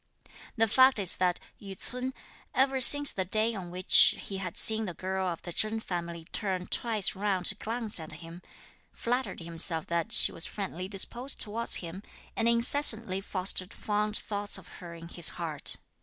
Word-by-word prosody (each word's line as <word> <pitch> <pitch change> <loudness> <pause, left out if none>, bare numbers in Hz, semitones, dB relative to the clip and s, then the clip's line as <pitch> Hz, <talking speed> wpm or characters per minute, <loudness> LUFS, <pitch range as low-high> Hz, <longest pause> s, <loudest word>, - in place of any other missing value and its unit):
The 225 0 +2
fact 260 +4 +4
is 195 -4 +3
that 180 -1 -1 0.2
Yü 195 -2 -10
ts'un, 250 +4 -4 0.4
ever 265 0 +1
since 290 +3 +5
the 190 - -4
day 215 +5 -1
on 190 -5 -8
which 180 +1 +5
he 195 - -8
had 180 -3 -7
seen 220 0 +2
the 175 -4 -7
girl 190 +1 -4
of 170 -2 -6
the 175 - -8
Chen 215 +4 -2
family 170 -4 -7
turn 190 -4 -4
twice 220 -3 +1
round 190 -2 -2
to - - +1
glance 225 -3 -2
at 160 - -9
him, 165 +2 -12 0.5
flattered 245 -4 -4
himself 165 -1 -5
that 170 -1 -3
she - - +6
was 165 - -1
friendly 185 -3 -6
disposed 240 +7 -1
towards 230 +2 +3
him, 170 +4 -9 0.3
and 230 - +1
incessantly 235 -5 +5
fostered 185 -1 -2
fond 210 0 -1
thoughts 205 -1 -4
of - - -15
her 170 -1 -10
in 165 0 -12
his 170 -1 +4
heart. 160 -4 -3
195 Hz, 175 wpm, -28 LUFS, 175-225 Hz, 0.5 s, she